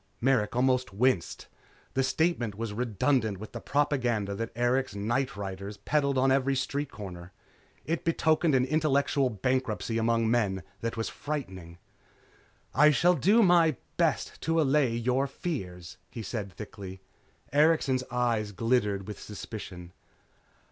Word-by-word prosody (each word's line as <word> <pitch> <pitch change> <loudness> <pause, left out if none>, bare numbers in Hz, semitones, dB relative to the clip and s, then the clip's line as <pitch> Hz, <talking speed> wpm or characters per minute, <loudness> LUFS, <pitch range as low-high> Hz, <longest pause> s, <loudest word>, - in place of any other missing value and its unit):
Merrick 120 -4 +2
almost 125 -3 +2
winced. 115 -6 +1 0.5
The 135 - +1
statement 130 - 0
was 110 0 -4
redundant 110 -1 0
with 110 +3 -9
the - - -6
propaganda 125 -8 0
that 115 +3 -3
Erikson's 120 -3 0
nightriders 105 -6 -3
peddled 140 -2 +1
on 130 +1 +3
every 135 0 +2
street 140 +2 -2
corner. 90 -3 -9 0.5
It 165 +2 -2
betokened 160 -2 +2
an 130 -1 +3
intellectual 140 -2 +2
bankruptcy 115 0 -1
among 115 0 +2
men 100 -6 +1 0.2
that 115 +2 -3
was 115 - -1
frightening. 95 - -6 1.0
"I 150 +1 +6
shall 170 +4 +4
do 200 - +4
my 170 -5 +5 0.2
best - - 0
to 165 +1 +1
allay 135 -5 +3
your 125 +4 +1
fears," 95 - -5
he 115 - -7
said 105 -2 -4
thickly. 95 -1 -9 0.5
Erikson's 145 -4 +3
eyes 120 -4 0
glittered 105 -2 0
with 105 - -7
suspicion. 95 -4 -8
125 Hz, 130 wpm, -28 LUFS, 105-140 Hz, 1.0 s, I